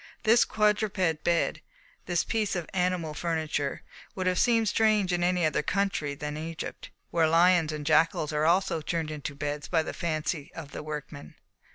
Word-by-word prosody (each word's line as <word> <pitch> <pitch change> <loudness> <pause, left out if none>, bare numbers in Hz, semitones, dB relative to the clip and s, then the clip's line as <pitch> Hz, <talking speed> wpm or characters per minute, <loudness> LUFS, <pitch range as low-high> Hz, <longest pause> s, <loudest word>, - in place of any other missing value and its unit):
This 230 +1 +5
quadruped 210 -6 +1
bed, 170 -1 +1 0.5
this 175 -2 +1
piece 215 -3 -1
of 175 -3 -3
animal 180 -4 0
furniture, 155 -3 -2 0.3
would 185 - -3
have 185 0 +1
seemed 230 -2 +3
strange 210 -3 +2
in 175 0 0
any 180 -1 +2
other 155 -2 +1
country 185 -4 -1
than 150 +1 -5
Egypt, 160 +1 -6 0.2
where 165 -2 +3
lions 170 -1 +4
and 150 -1 -5
jackals 155 -1 +2
are 150 +1 +1
also 175 -1 +2
turned 160 0 -2
into 145 -1 -6
beds 145 +1 -4
by 165 -2 +1
the - - -5
fancy 155 -3 -3
of 150 -4 -8
the - - -6
workmen. 150 -1 -7
165 Hz, 170 wpm, -28 LUFS, 150-185 Hz, 0.5 s, This